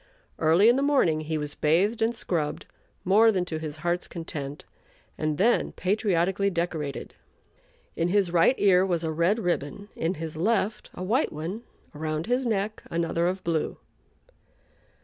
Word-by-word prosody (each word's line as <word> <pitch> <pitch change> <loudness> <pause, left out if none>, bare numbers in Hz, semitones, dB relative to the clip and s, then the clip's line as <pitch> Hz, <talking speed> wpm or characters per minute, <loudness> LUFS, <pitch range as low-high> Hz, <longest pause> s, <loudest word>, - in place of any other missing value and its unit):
Early 165 +6 +5
in 240 +2 +5
the - - +1
morning 265 - +2
he 155 0 -2
was 150 -1 -3
bathed 190 +10 +1
and 230 +2 +1
scrubbed, 160 -8 -2 0.4
more 215 +5 +6
than 185 -4 0
to 160 -3 -4
his 155 -1 -6
heart's 175 +1 0
content, 150 -4 -6 0.5
and 155 -1 -2
then 230 +6 +2
patriotically 195 -1 +1
decorated. 170 -5 -3 0.8
In 170 - 0
his 190 -1 +2
right 170 +9 +4
ear 185 -2 +5
was 175 -3 0
a 160 - -1
red 170 +7 +2
ribbon, 200 0 -3
in 170 +4 -1
his 160 -1 -6
left 210 +4 0
a 180 - -5
white 235 +10 +1
one; 165 +9 -5 0.3
around 155 +1 -3
his 250 +3 0
neck 215 -1 -1
another 170 0 0
of 185 +1 -2
blue. 165 -2 -1
175 Hz, 155 wpm, -26 LUFS, 160-205 Hz, 0.8 s, more